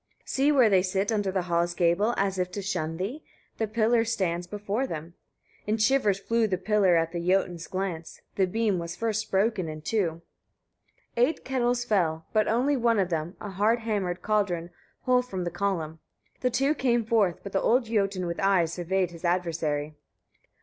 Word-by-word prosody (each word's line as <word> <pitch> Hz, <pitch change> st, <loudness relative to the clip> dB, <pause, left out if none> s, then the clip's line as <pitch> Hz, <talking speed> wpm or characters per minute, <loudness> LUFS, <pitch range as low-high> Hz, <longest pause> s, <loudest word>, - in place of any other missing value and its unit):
12. -, -, -18 dB
See 275 Hz, +2 st, +2 dB
where 260 Hz, -5 st, +5 dB
they 190 Hz, -2 st, +5 dB
sit 190 Hz, +3 st, -1 dB
under 205 Hz, -3 st, 0 dB
the 185 Hz, -1 st, -1 dB
hall's 170 Hz, 0 st, 0 dB
gable, 185 Hz, +7 st, +2 dB
as 195 Hz, -1 st, 0 dB
if 180 Hz, 0 st, 0 dB
to 200 Hz, -, -4 dB
shun 165 Hz, -4 st, -2 dB
thee: 225 Hz, -, -4 dB, 0.4 s
the 220 Hz, -, 0 dB
pillar 225 Hz, +2 st, +2 dB
stands 185 Hz, -6 st, -1 dB
before 210 Hz, +6 st, -2 dB
them." 165 Hz, -2 st, -6 dB, 0.5 s
In 215 Hz, +1 st, +1 dB
shivers 215 Hz, -3 st, +3 dB
flew 230 Hz, +3 st, +1 dB
the 190 Hz, -3 st, -1 dB
pillar 195 Hz, -2 st, +3 dB
at 165 Hz, 0 st, +1 dB
the 175 Hz, -, -3 dB
Jotun's 175 Hz, -1 st, 0 dB
glance; 185 Hz, -4 st, -4 dB
the 190 Hz, -2 st, +2 dB
beam 210 Hz, -1 st, 0 dB
was 170 Hz, 0 st, -5 dB
first 220 Hz, +1 st, -2 dB
broken 195 Hz, -2 st, +1 dB
in 155 Hz, 0 st, -7 dB
two. 170 Hz, -5 st, -1 dB, 0.9 s
13. 245 Hz, +1 st, +5 dB
Eight 325 Hz, -, -7 dB
kettles 245 Hz, -2 st, 0 dB
fell, 165 Hz, -7 st, 0 dB
but 215 Hz, -1 st, +3 dB
only 255 Hz, +6 st, +2 dB
one 235 Hz, -3 st, +2 dB
of 190 Hz, -3 st, +1 dB
them, 165 Hz, +2 st, -2 dB
a 205 Hz, -, -6 dB
hard 215 Hz, +5 st, +2 dB
hammered 200 Hz, -5 st, -2 dB
cauldron, 185 Hz, -5 st, 0 dB, 0.3 s
whole 250 Hz, 0 st, +3 dB
from 195 Hz, -8 st, -5 dB
the 175 Hz, -, -3 dB
column. 170 Hz, -4 st, -2 dB, 0.4 s
The 250 Hz, -, +1 dB
two 270 Hz, +4 st, +2 dB
came 240 Hz, -5 st, +1 dB
forth, 210 Hz, -6 st, +1 dB
but 200 Hz, -, -7 dB
the 195 Hz, -, 0 dB
old 245 Hz, +1 st, +3 dB
Jotun 200 Hz, -4 st, 0 dB
with 170 Hz, 0 st, -4 dB
eyes 185 Hz, -5 st, +2 dB
surveyed 180 Hz, +1 st, -1 dB
his 170 Hz, 0 st, -12 dB
adversary. 165 Hz, -4 st, -1 dB
195 Hz, 190 wpm, -27 LUFS, 175-225 Hz, 0.9 s, where